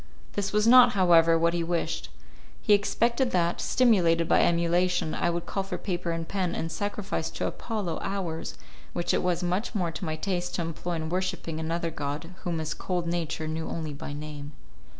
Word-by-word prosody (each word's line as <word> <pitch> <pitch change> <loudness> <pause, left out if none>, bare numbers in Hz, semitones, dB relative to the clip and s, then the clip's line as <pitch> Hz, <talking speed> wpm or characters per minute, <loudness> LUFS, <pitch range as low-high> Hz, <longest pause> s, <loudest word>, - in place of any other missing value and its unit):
This 200 -1 -1
was 210 0 +2
not, 250 +1 +8
however, 165 -3 +5
what 170 +1 +2
he 170 -1 0
wished; 165 - -2 0.5
he 210 - +3
expected 235 +5 +2
that, 175 -4 +1
stimulated 175 -9 +3
by - - +4
emulation, 170 0 +2
I 175 - +1
would 170 0 -2
call 195 - -2
for 195 +1 -4
paper 175 -3 -3
and 165 -1 -2
pen, 185 -3 -1
and 165 - -3
sacrifice 205 -2 -3
to - - -3
Apollo 210 -8 -3
hours 175 -5 -3 0.4
which 175 - 0
it - - +2
was 180 -1 0
much 185 +6 -1
more 175 -5 0
to 165 - -7
my 155 -3 -2
taste 175 +1 -2
to 170 - -1
employ 165 +2 -4
in 160 -1 -3
worshipping 180 -3 -2
another 165 +1 -2
god 150 +4 -4
whom 170 -2 -2
his 155 -1 -2
cold 180 -2 -2
nature 165 -2 -2
knew 160 +1 -3
only 160 -3 -4
by 145 - -7
name. 145 0 -7
170 Hz, 190 wpm, -27 LUFS, 165-185 Hz, 0.5 s, not